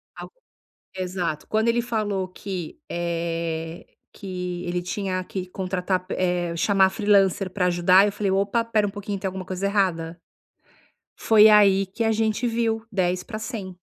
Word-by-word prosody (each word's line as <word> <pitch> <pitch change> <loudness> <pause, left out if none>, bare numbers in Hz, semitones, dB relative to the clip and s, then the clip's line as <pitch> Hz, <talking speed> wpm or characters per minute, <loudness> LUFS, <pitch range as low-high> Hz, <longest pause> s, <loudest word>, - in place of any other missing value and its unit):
algo - - -9 0.6
exato, 180 -4 -3
quando 220 +2 +1
ele 240 +1 +2
falou 210 -5 -2
que 185 -2 -7
eh, 165 -1 -3 0.3
que 180 -2 -5
ele 175 0 -2
tinha 185 0 -3
que 185 0 -5
contratar 185 0 -2
eh 175 -2 0
chamar 190 +2 +4
freelancer 195 -2 +2
pra 180 -1 0
ajudar 180 +3 +5
eu 205 - 0
falei: 205 -1 -1
"Opa 200 +4 +1
espera 220 -2 +1
um - - -2
pouquinho 205 0 -5
tem 195 - -3
alguma 185 0 -5
coisa 190 +1 -2
errada.". 175 -4 0 1.0
Foi 220 -1 +6
aí 195 -2 +5
que 225 +5 -3
a 225 - +2
gente 220 +2 0
viu 225 -1 -1
10 180 -1 0
pra 215 -2 -6
100. 205 -6 -6
190 Hz, 155 wpm, -24 LUFS, 180-210 Hz, 1.0 s, Foi